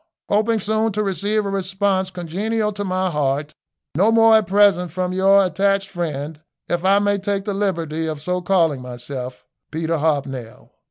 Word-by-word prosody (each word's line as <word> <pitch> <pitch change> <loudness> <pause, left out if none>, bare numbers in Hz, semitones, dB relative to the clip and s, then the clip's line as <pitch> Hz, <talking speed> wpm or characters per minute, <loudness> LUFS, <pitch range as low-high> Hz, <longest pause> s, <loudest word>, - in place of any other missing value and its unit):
Hoping 215 +2 +2
soon 220 +2 0
to 210 +1 0
receive 205 +3 0
a - - -2
response 190 0 0
congenial 200 +5 -2
to 205 0 -5
my 185 -1 -1
heart, 145 0 -1 0.4
no 195 +9 +3
more 225 0 +6
at 215 - -1
present 195 -2 +3
from 180 +2 -2
your 195 +1 +4
attached 195 +1 0
friend, 155 -3 -4 0.3
if 175 0 -1
I 195 +1 +4
may 205 0 +1
take 195 0 -2
the 205 - -2
liberty 165 -5 -2
of 155 -2 -4
so 180 +4 -2
calling 170 -7 +1
myself, 125 +1 -7 0.2
"Peter 160 +1 -2
Hobnail." 135 -6 -3
185 Hz, 165 wpm, -21 LUFS, 160-200 Hz, 0.4 s, more